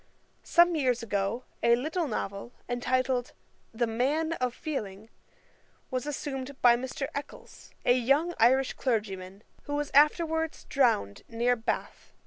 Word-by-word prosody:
Some 345 Hz, 0 st, +4 dB
years 250 Hz, -6 st, +1 dB
ago 205 Hz, +2 st, -1 dB, 0.2 s
a 235 Hz, 0 st, +5 dB
little 315 Hz, +7 st, -2 dB
novel, 200 Hz, -1 st, -4 dB
entitled 250 Hz, 0 st, 0 dB, 0.4 s
The 235 Hz, +1 st, 0 dB
Man 280 Hz, +8 st, 0 dB
of 255 Hz, -5 st, -1 dB
Feeling, 220 Hz, -, -5 dB, 0.8 s
was 255 Hz, +2 st, -2 dB
assumed 275 Hz, -2 st, -5 dB
by 240 Hz, -1 st, +6 dB
Mr. 260 Hz, +3 st, -4 dB
Eccles, 285 Hz, -, -8 dB, 0.2 s
a 245 Hz, -, +6 dB
young 275 Hz, +8 st, +2 dB
Irish 260 Hz, +3 st, +4 dB
clergyman, 200 Hz, -5 st, -3 dB, 0.2 s
who 290 Hz, -, -3 dB
was 295 Hz, 0 st, -2 dB
afterwards 320 Hz, +2 st, +3 dB
drowned 230 Hz, -, +1 dB
near 240 Hz, +2 st, +1 dB
Bath. 225 Hz, -1 st, -4 dB
255 Hz, 125 wpm, -28 LUFS, 230-290 Hz, 0.8 s, by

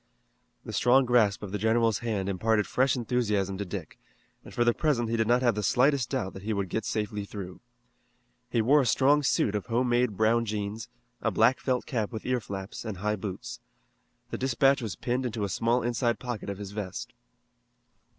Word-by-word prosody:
The -, -, -7 dB
strong 130 Hz, +2 st, +4 dB
grasp 110 Hz, -5 st, +3 dB
of 100 Hz, -, -6 dB
the 105 Hz, -, -2 dB
general's 115 Hz, +1 st, +2 dB
hand 105 Hz, -5 st, -2 dB
imparted 105 Hz, +2 st, +1 dB
fresh 130 Hz, 0 st, +2 dB
enthusiasm 105 Hz, -6 st, -1 dB
to 100 Hz, -, -2 dB
Dick, 90 Hz, -4 st, -7 dB, 0.4 s
and -, -, -12 dB
for 120 Hz, -, +1 dB
the 120 Hz, 0 st, +3 dB
present 120 Hz, -7 st, 0 dB
he -, -, +1 dB
did 115 Hz, -1 st, +1 dB
not 120 Hz, +2 st, +3 dB
have 120 Hz, -2 st, +4 dB
the 105 Hz, -, -2 dB
slightest 130 Hz, +4 st, +2 dB
doubt 125 Hz, -9 st, -2 dB
that 95 Hz, -, -9 dB
he 110 Hz, +3 st, -2 dB
would 100 Hz, -2 st, -2 dB
get 110 Hz, +2 st, -2 dB
safely 105 Hz, -1 st, -2 dB
through. 100 Hz, -3 st, -8 dB, 0.9 s
He 115 Hz, -2 st, +1 dB
wore 145 Hz, +6 st, +5 dB
a -, -, 0 dB
strong 140 Hz, +5 st, +4 dB
suit 125 Hz, -6 st, +1 dB
of 105 Hz, +1 st, -3 dB
home 120 Hz, +2 st, +1 dB
made 120 Hz, -4 st, +1 dB
brown 115 Hz, +2 st, +3 dB
jeans, 105 Hz, 0 st, -4 dB, 0.3 s
a 115 Hz, -, +1 dB
black 115 Hz, +5 st, +3 dB
felt 130 Hz, -2 st, -1 dB
cap 110 Hz, -5 st, -2 dB
with 110 Hz, -2 st, -6 dB
ear 125 Hz, -1 st, +1 dB
flaps, 95 Hz, -1 st, -7 dB
and 110 Hz, -4 st, -5 dB
high 105 Hz, +3 st, -1 dB
boots. 95 Hz, -2 st, -6 dB, 0.7 s
The -, -, -4 dB
dispatch 135 Hz, +1 st, +3 dB
was 110 Hz, -7 st, -4 dB
pinned 125 Hz, +1 st, -2 dB
into 110 Hz, -2 st, -3 dB
a 100 Hz, -, -1 dB
small 115 Hz, +5 st, +1 dB
inside 120 Hz, 0 st, 0 dB
pocket 120 Hz, -5 st, -5 dB
of 100 Hz, -, -4 dB
his 100 Hz, -1 st, -7 dB
vest. 110 Hz, +4 st, -6 dB
115 Hz, 200 wpm, -28 LUFS, 105-125 Hz, 0.9 s, wore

